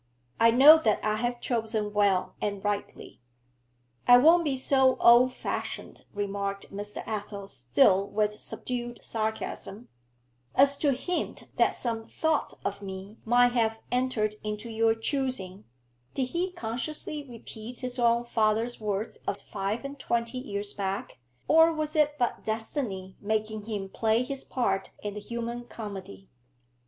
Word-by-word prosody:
I 230 Hz, -, +6 dB
know 280 Hz, +7 st, +9 dB
that 220 Hz, -8 st, +2 dB
I 215 Hz, 0 st, +1 dB
have 240 Hz, +1 st, -2 dB
chosen 220 Hz, -3 st, -1 dB
well 200 Hz, -3 st, +2 dB
and 200 Hz, -2 st, -2 dB
rightly.' 205 Hz, -9 st, -4 dB, 0.9 s
'I 245 Hz, -, +10 dB
won't 330 Hz, +7 st, +6 dB
be 280 Hz, -4 st, 0 dB
so 265 Hz, 0 st, +4 dB
old 240 Hz, +2 st, +6 dB
fashioned,' -, -, -5 dB
remarked 200 Hz, -1 st, -3 dB
Mr. 205 Hz, +1 st, -4 dB
Athel, 205 Hz, -2 st, -5 dB
still 135 Hz, +9 st, +3 dB
with 210 Hz, 0 st, 0 dB
subdued 240 Hz, +2 st, -5 dB
sarcasm, 220 Hz, 0 st, -3 dB, 0.7 s
'as 280 Hz, +1 st, +5 dB
to 285 Hz, -2 st, +2 dB
hint 355 Hz, +8 st, -3 dB
that -, -, +3 dB
some 225 Hz, -2 st, -2 dB
thought 320 Hz, -2 st, -1 dB
of 200 Hz, 0 st, -3 dB
me 195 Hz, +2 st, -8 dB
might 245 Hz, +2 st, +5 dB
have 225 Hz, -2 st, +1 dB
entered 245 Hz, -4 st, 0 dB
into 210 Hz, +2 st, -4 dB
your 225 Hz, 0 st, +2 dB
choosing' 225 Hz, -6 st, -2 dB, 0.5 s
(did 260 Hz, -2 st, -1 dB
he 360 Hz, +4 st, -1 dB
consciously 300 Hz, +2 st, -3 dB
repeat 235 Hz, -2 st, -9 dB
his 250 Hz, 0 st, -3 dB
own 235 Hz, 0 st, +3 dB
father's 225 Hz, +1 st, +1 dB
words 210 Hz, +1 st, -3 dB
of 200 Hz, -, -1 dB
five 205 Hz, +8 st, -4 dB
and 280 Hz, 0 st, -7 dB
twenty 235 Hz, 0 st, -1 dB
years 205 Hz, -4 st, -3 dB
back, 195 Hz, -6 st, -4 dB, 0.3 s
or 325 Hz, +1 st, +6 dB
was 310 Hz, -1 st, -3 dB
it 300 Hz, -1 st, +3 dB
but 245 Hz, -3 st, -1 dB
destiny 220 Hz, -4 st, -3 dB
making 215 Hz, 0 st, -2 dB
him 205 Hz, -3 st, -4 dB
play 220 Hz, +4 st, +1 dB
his 275 Hz, +1 st, -5 dB
part 195 Hz, -7 st, -1 dB
in 205 Hz, -1 st, -3 dB
the 210 Hz, -, -5 dB
human 235 Hz, +2 st, -5 dB
comedy?) 200 Hz, -4 st, -8 dB
225 Hz, 145 wpm, -28 LUFS, 205-250 Hz, 0.9 s, I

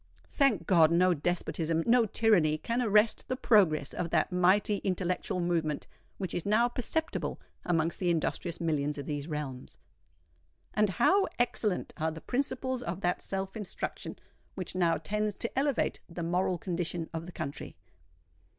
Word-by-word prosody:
Thank 275 Hz, -7 st, +2 dB
God, 165 Hz, -5 st, +5 dB
no 180 Hz, +2 st, +4 dB
despotism—no 170 Hz, +7 st, +1 dB
tyranny 180 Hz, -9 st, +3 dB
can 235 Hz, +9 st, -1 dB
arrest 215 Hz, -1 st, +3 dB
the 255 Hz, -, -1 dB
progress 175 Hz, -, +3 dB
of 175 Hz, -1 st, -3 dB
that -, -, +1 dB
mighty 185 Hz, +3 st, +3 dB
intellectual 185 Hz, -1 st, -2 dB
movement 165 Hz, -4 st, -1 dB, 0.3 s
which 190 Hz, -3 st, -4 dB
is 175 Hz, -, -2 dB
now 215 Hz, +4 st, +3 dB
perceptible 315 Hz, +7 st, -2 dB, 0.3 s
amongst 165 Hz, -1 st, 0 dB
the 180 Hz, -, +1 dB
industrious 170 Hz, +1 st, -1 dB
millions 150 Hz, -3 st, -1 dB
of 140 Hz, -, -5 dB
these 145 Hz, 0 st, -4 dB
realms. 145 Hz, -5 st, -5 dB, 1.0 s
And 210 Hz, -1 st, +3 dB
how 370 Hz, -, +3 dB
excellent 225 Hz, -5 st, 0 dB
are 160 Hz, -1 st, 0 dB
the 160 Hz, 0 st, -7 dB
principles 260 Hz, -, -2 dB
of 185 Hz, -3 st, -4 dB
that 180 Hz, -1 st, 0 dB
self 195 Hz, +1 st, -4 dB
instruction 210 Hz, -3 st, -5 dB, 0.4 s
which 185 Hz, -3 st, -5 dB
now 175 Hz, -2 st, +2 dB
tends 210 Hz, +6 st, -2 dB
to 235 Hz, -, -4 dB
elevate 280 Hz, -2 st, 0 dB
the 170 Hz, 0 st, -5 dB
moral 180 Hz, +2 st, +1 dB
condition 170 Hz, -1 st, -3 dB
of 165 Hz, +1 st, -5 dB
the -, -, -7 dB
country. 150 Hz, -4 st, -6 dB
180 Hz, 150 wpm, -30 LUFS, 165-215 Hz, 1.0 s, God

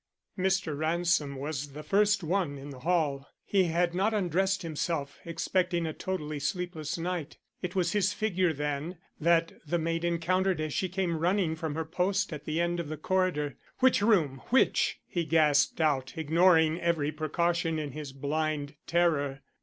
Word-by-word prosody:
Mr. 190 Hz, -5 st, 0 dB
Ransom 160 Hz, -2 st, +1 dB
was 140 Hz, 0 st, -4 dB
the 150 Hz, +2 st, -7 dB
first 205 Hz, +1 st, +3 dB
one 165 Hz, -4 st, 0 dB
in 140 Hz, +1 st, -8 dB
the 130 Hz, -, -10 dB
hall. 145 Hz, -3 st, 0 dB, 0.2 s
He 195 Hz, -2 st, +3 dB
had 170 Hz, +1 st, +1 dB
not 200 Hz, +5 st, +1 dB
undressed 190 Hz, 0 st, +1 dB
himself, 155 Hz, -3 st, -3 dB
expecting 175 Hz, +1 st, 0 dB
a 160 Hz, -, -3 dB
totally 155 Hz, -6 st, -4 dB
sleepless 175 Hz, -2 st, -3 dB
night. 170 Hz, -3 st, -4 dB, 0.2 s
It 180 Hz, 0 st, -4 dB
was 175 Hz, -2 st, +1 dB
his 200 Hz, -2 st, +2 dB
figure, 185 Hz, -4 st, +1 dB
then, 150 Hz, +3 st, -3 dB, 0.2 s
that 165 Hz, +1 st, +3 dB, 0.2 s
the 175 Hz, -, +1 dB
maid 165 Hz, 0 st, -1 dB
encountered 175 Hz, +2 st, +1 dB
as 155 Hz, -2 st, -2 dB
she 185 Hz, -, -1 dB
came 180 Hz, -3 st, -1 dB
running 175 Hz, -1 st, +1 dB
from 160 Hz, -2 st, -4 dB
her 160 Hz, 0 st, -2 dB
post 185 Hz, +3 st, 0 dB
at 150 Hz, -, -7 dB
the 155 Hz, +1 st, -1 dB
end 170 Hz, 0 st, 0 dB
of 165 Hz, -3 st, -4 dB
the 155 Hz, -, -4 dB
corridor. 165 Hz, -4 st, 0 dB, 0.2 s
"Which 260 Hz, -4 st, +4 dB
room? 165 Hz, -, +2 dB
which?" 265 Hz, -, +3 dB
he 175 Hz, -, -2 dB
gasped 150 Hz, -3 st, +3 dB
out, 145 Hz, -5 st, +1 dB
ignoring 160 Hz, +1 st, +4 dB
every 160 Hz, -4 st, +1 dB
precaution 165 Hz, +2 st, 0 dB
in 150 Hz, -2 st, -3 dB
his 150 Hz, 0 st, -7 dB
blind 145 Hz, +1 st, -2 dB
terror. 150 Hz, -5 st, +1 dB
165 Hz, 165 wpm, -29 LUFS, 150-180 Hz, 0.2 s, Which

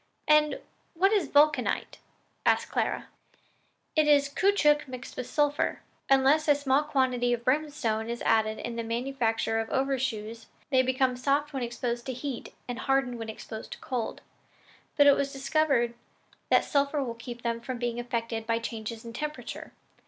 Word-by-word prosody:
"And 300 Hz, 0 st, +4 dB, 0.4 s
what 385 Hz, +5 st, +3 dB
is 390 Hz, -8 st, +2 dB
vulcanite?" 300 Hz, +1 st, +2 dB, 0.4 s
asked -, -, +2 dB
Clara. -, -, -1 dB, 0.9 s
"It 310 Hz, -1 st, +4 dB
is 285 Hz, -1 st, +5 dB
caoutchouc 300 Hz, -4 st, +3 dB
mixed 255 Hz, -1 st, -8 dB
with 250 Hz, -, -5 dB
sulphur. 290 Hz, 0 st, +1 dB, 0.3 s
Unless 275 Hz, +4 st, +4 dB
a 290 Hz, -, +6 dB
small 280 Hz, 0 st, +2 dB
quantity 260 Hz, -5 st, +1 dB
of 235 Hz, -1 st, -3 dB
brimstone 255 Hz, -6 st, 0 dB
is 235 Hz, 0 st, -4 dB
added 220 Hz, -1 st, +2 dB
in 235 Hz, 0 st, -5 dB
the 230 Hz, -, -2 dB
manufacture 230 Hz, -1 st, -1 dB
of 225 Hz, -, -3 dB
overshoes, 240 Hz, -5 st, -2 dB, 0.2 s
they 260 Hz, -1 st, +5 dB
become 260 Hz, 0 st, +1 dB
soft 285 Hz, +3 st, 0 dB
when 265 Hz, -, -2 dB
exposed 240 Hz, 0 st, -3 dB
to 260 Hz, -, -2 dB
heat 255 Hz, 0 st, -5 dB, 0.2 s
and 245 Hz, -1 st, -4 dB
hardened 270 Hz, -3 st, 0 dB
when 225 Hz, -1 st, -5 dB
exposed 220 Hz, 0 st, -7 dB
to -, -, -10 dB
cold; 245 Hz, -4 st, -4 dB, 0.8 s
but 290 Hz, -, +7 dB
it 285 Hz, -, +8 dB
was 280 Hz, 0 st, -1 dB
discovered 275 Hz, -3 st, +1 dB, 0.6 s
that -, -, +5 dB
the -, -, -11 dB
sulphur 280 Hz, 0 st, +1 dB
will 240 Hz, -3 st, -4 dB
keep 235 Hz, +1 st, -9 dB
them 230 Hz, 0 st, -1 dB
from 250 Hz, +1 st, -5 dB
being 240 Hz, 0 st, -2 dB
affected 230 Hz, -2 st, -3 dB
by 230 Hz, 0 st, +2 dB
changes 230 Hz, 0 st, -5 dB
in 230 Hz, -, -8 dB
temperature. 300 Hz, +4 st, -6 dB
255 Hz, 165 wpm, -28 LUFS, 235-285 Hz, 0.9 s, it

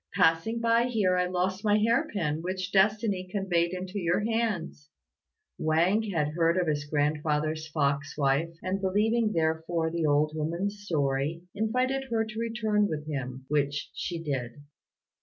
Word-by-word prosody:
Passing 180 Hz, +5 st, +3 dB
by 230 Hz, +1 st, +3 dB
here 210 Hz, -7 st, +1 dB
I 180 Hz, 0 st, +2 dB
lost 185 Hz, +2 st, -1 dB
my 210 Hz, -1 st, +4 dB
hair 230 Hz, +2 st, +2 dB
pin, 160 Hz, -6 st, -1 dB
which 185 Hz, +2 st, -3 dB
destiny 200 Hz, -1 st, +2 dB
conveyed 175 Hz, -4 st, +1 dB
into 185 Hz, +2 st, -4 dB
your 175 Hz, +2 st, +1 dB
hands." 210 Hz, -9 st, -2 dB, 0.7 s
Wang 170 Hz, +7 st, +3 dB
had 155 Hz, -6 st, 0 dB
heard 165 Hz, +2 st, +2 dB
of 180 Hz, -, +2 dB
his 145 Hz, -2 st, -1 dB
grandfather's 150 Hz, +1 st, 0 dB
fox 145 Hz, -2 st, -1 dB
wife, 145 Hz, +4 st, +1 dB
and 190 Hz, +2 st, -2 dB
believing 215 Hz, +4 st, +2 dB
therefore 160 Hz, -1 st, 0 dB
the 165 Hz, -2 st, 0 dB
old 150 Hz, +1 st, +3 dB
woman's 170 Hz, +7 st, -2 dB
story, 145 Hz, 0 st, -1 dB
invited 255 Hz, +6 st, 0 dB
her 230 Hz, -3 st, 0 dB
to 220 Hz, 0 st, -7 dB
return 220 Hz, -3 st, +1 dB
with 150 Hz, -4 st, -4 dB
him, 130 Hz, -3 st, -5 dB
which 145 Hz, -2 st, -1 dB
she 175 Hz, -, -4 dB
did. 140 Hz, -3 st, -4 dB
175 Hz, 150 wpm, -28 LUFS, 150-210 Hz, 0.7 s, my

